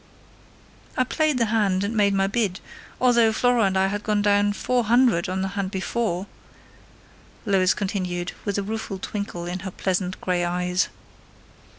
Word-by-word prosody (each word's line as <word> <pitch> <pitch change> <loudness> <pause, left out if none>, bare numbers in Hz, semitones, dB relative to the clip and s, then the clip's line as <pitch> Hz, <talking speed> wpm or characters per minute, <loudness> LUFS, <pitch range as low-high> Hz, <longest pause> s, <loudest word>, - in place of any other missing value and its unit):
"I 255 - +4
played 305 +2 0
the 235 - +2
hand 205 -4 +1
and 210 +3 -2
made 200 -2 +3
my 195 0 +2
bid, 200 -2 -1 0.4
although 235 -3 +4
Flora 245 0 +3
and 190 -1 +1
I 190 - +3
had 205 +2 -2
gone 210 -1 0
down 205 0 +3
400 240 -5 +2
on 190 +1 -1
the 190 - -1
hand 200 -1 -3
before," 195 -1 -2 1.2
Lois 190 -3 +3
continued, 180 -3 -2
with 205 -1 -2
a 200 - -1
rueful 220 -1 -4
twinkle 195 -3 -5
of 180 +1 -4
her 190 - -5
pleasant 185 0 -2
grey 180 -1 0
eyes. 180 +1 0
200 Hz, 160 wpm, -24 LUFS, 185-220 Hz, 1.2 s, I